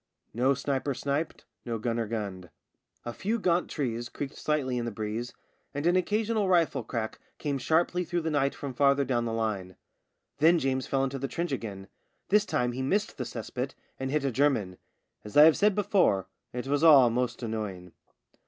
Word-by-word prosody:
No 130 +4 +2
sniper 140 0 -2
sniped, 145 +5 -3 0.2
no 115 -2 -3
gunner 115 0 -1
gunned. 100 -5 -5 0.6
A 120 - -4
few 215 - -1
gaunt 180 -4 +1
trees 120 -5 -3
creaked 140 -1 -5
slightly 135 -5 -1
in 120 - -3
the - - -1
breeze, 110 +2 -4 0.4
and 145 +2 -2
an 175 +1 +4
occasional 210 +2 +1
rifle 165 -7 +3
crack 110 -1 -4 0.2
came 140 -3 -2
sharply 175 +5 +1
through 175 0 -2
the 160 0 -2
night 140 -2 +1
from 140 -2 -6
farther 140 +1 +3
down 120 -3 0
the 115 - -2
line. 105 -5 -2 0.6
Then 165 +3 +6
James 130 -3 -1
fell 135 -1 +1
into 135 0 -2
the 135 - -2
trench 170 +4 -3
again. 100 -7 -5 0.4
This 210 +1 +4
time 125 0 0
he 125 +2 -4
missed 200 +11 -1
the - - -2
cess 115 -3 -7
pit 130 +2 -3 0.2
and 135 0 -2
hit 145 0 0
a 135 - +1
German. 115 -9 +1 0.4
As 105 +6 -5
I 150 - +10
have 160 0 +7
said 205 -1 +3
before, 185 - +2 0.3
it 125 +1 -4
was 145 +3 0
all 140 -7 +8
most 125 +1 -1
annoying. 105 -6 -4
135 Hz, 190 wpm, -28 LUFS, 115-155 Hz, 0.6 s, I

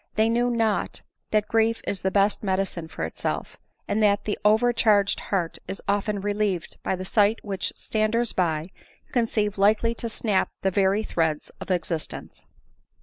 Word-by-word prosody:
They 220 +1 +3
knew 240 +1 +2
not 225 -3 0 0.3
that 215 -1 +1
grief 225 0 +2
is 195 - -2
the 190 - +1
best 200 +1 +2
medicine 190 -4 -1
for 160 - -6
itself; 80 - -3 0.3
and 215 - 0
that 205 -1 +3
the 210 - 0
over 220 +4 +4
charged 210 -4 +3
heart 180 -5 -2
is 195 - -4
often 205 0 0
relieved 205 -4 -1
by. - - -1
the 185 0 -6
sight 210 +2 +3
which 195 -3 -3
standers 220 +2 0
by 165 -2 0 0.4
conceive 215 -4 0
likely 215 +3 +3
to 235 0 -4
snap 215 -3 +1
the 190 - +2
very 195 +2 +2
threads 160 -6 -1
of - - -7
existence. 170 -3 -3
205 Hz, 160 wpm, -25 LUFS, 190-220 Hz, 0.4 s, over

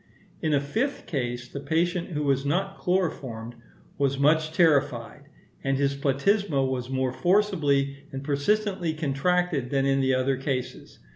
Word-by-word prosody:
In 155 - 0
a - - +3
fifth 225 - -2
case, 120 -5 -3
the 140 - -7
patient, 170 +4 0
who 150 0 -1
was 135 -2 +1
not 190 +7 -1
chloroformed, 135 -11 -2 0.5
was 140 -1 +1
much 155 +2 +3
terrified; 145 -5 +1 0.4
and 135 0 +1
his 140 0 +1
platysma 140 +2 +1
was 125 -1 -3
more 130 -1 -1
forcibly 145 -4 +2
and 135 0 -5
persistently 175 +4 0
contracted 155 -1 0
than 135 -1 +1
in 135 0 +2
the 130 0 +2
other 130 +1 +1
cases. 130 -2 -4
140 Hz, 145 wpm, -26 LUFS, 135-175 Hz, 0.5 s, a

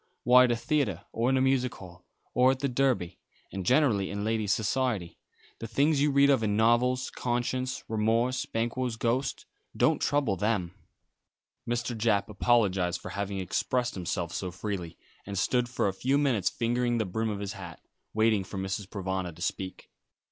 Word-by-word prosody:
Why 125 +1 +7
at 120 - +1
a - - +2
theatre 125 - -1
or 115 +2 0
in 130 - +3
a - - +2
music 130 -2 +1
hall, 90 -2 -12 0.3
or 125 +1 +5
at 130 0 0
the 140 - +1
Derby 125 -9 0 0.3
and 95 - -4
generally 115 - +3
in 100 +1 -3
ladies' 110 -2 0
society. 110 -4 -1 0.4
The 115 - -5
things 140 +5 +2
you 150 - +4
read 140 0 +5
of 135 -4 +3
in 105 -2 0
novels, 125 +3 +2
conscience, 125 +1 -2
remorse, 115 +4 +1
Banquo's 120 +1 -2
ghost, 120 +4 -1 0.3
don't - - +3
trouble 145 -9 +1
them." 95 -3 -1 1.0
Mr. 120 0 -1
Japp 105 -3 +1
apologised 100 -5 +2
for - - -8
having 100 0 -3
expressed 120 +6 -1
himself 85 -2 -3
so 95 - -3
freely, 90 -2 -5 0.3
and 100 -1 -4
stood 120 +6 +1
for 125 - 0
a 95 - -1
few 130 +8 +1
minutes 120 -10 +2
fingering 120 +2 0
the 110 - 0
brim 110 +4 -2
of 105 - -3
his 100 -1 -4
hat, 85 -4 -9 0.3
waiting 110 -2 +2
for 95 - -8
Mrs. 95 +1 -3
Provana 95 -2 -3
to 85 - -14
speak. 95 0 -4
115 Hz, 175 wpm, -28 LUFS, 95-125 Hz, 1.0 s, Why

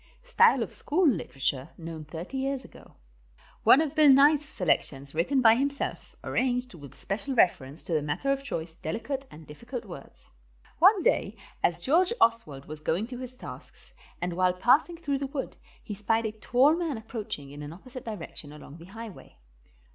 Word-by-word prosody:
STYLE - - +4
OF - - -8
SCHOOL 345 +3 +2
LITERATURE 140 - -2
KNOWN 165 -2 -7
THIRTY 170 - -7
YEARS 270 -1 -2
AGO. - - -16 0.7
ONE 275 - +7
OF 305 -3 -2
BILL 310 -2 +6
NYE'S 285 +2 +6
SELECTIONS, 145 - -1
WRITTEN 225 - +1
BY 225 -1 +7
HIMSELF 280 +1 -3
ARRANGED 250 -2 -1
WITH 145 -5 -12
SPECIAL 225 +7 -2
REFERENCE 150 - +2
TO 170 - -4
THE 155 - +2
MATTER 150 - -1
OF 275 0 0
CHOICE, 165 - -5
DELICATE 245 - -4
AND 155 +1 -13
DIFFICULT 235 - -8
WORDS. 175 -8 -12 0.5
One 380 +2 +6
day 200 - +1 0.3
as 170 0 +1
George 350 - +3
Oswald 155 -13 +1
was 155 0 -8
going 165 +7 -1
to 250 -1 -7
his 255 -1 -7
tasks, - - -12 0.3
and 175 0 -2
while 180 +1 +2
passing 275 - +3
through 285 -5 -2
the 275 - -3
wood, 275 0 -5 0.3
he 215 - -6
spied 225 +3 0
a 220 - -1
tall 250 +7 +3
man 330 -7 -2
approaching 215 - -6
in 145 +1 -9
an 145 0 -7
opposite 250 +9 -10
direction 170 -8 -8
along 150 0 -12
the 165 - -12
highway. 220 +2 -11
225 Hz, 175 wpm, -28 LUFS, 165-275 Hz, 0.7 s, ONE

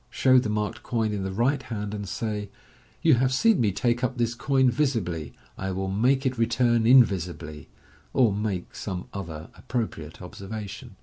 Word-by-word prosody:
Show 130 -1 +4
the 120 -3 -2
marked 105 -1 -2
coin 110 -3 -1
in 100 - -2
the 95 0 -3
right 120 +8 +1
hand, 105 -3 -5
and 100 -2 -5
say, 105 0 -3 0.3
" - - -31
You 160 -3 +6
have 130 0 +2
seen 215 - +3
me 105 -3 +2
take 120 +5 0
up 125 0 -1
this 120 -1 +1
coin 130 +1 +2
visibly, 105 - -1 0.3
I 95 - -2
will 95 0 -2
make 130 +7 +2
it 130 -2 -1
return 120 0 +2
invisibly/1 90 - +3 0.4
or 120 -6 +3
make 100 -3 -3
some 95 -3 -5
other 85 -5 -7
appropriate 110 - -4
observation. 105 +4 -8
110 Hz, 175 wpm, -26 LUFS, 95-125 Hz, 0.4 s, You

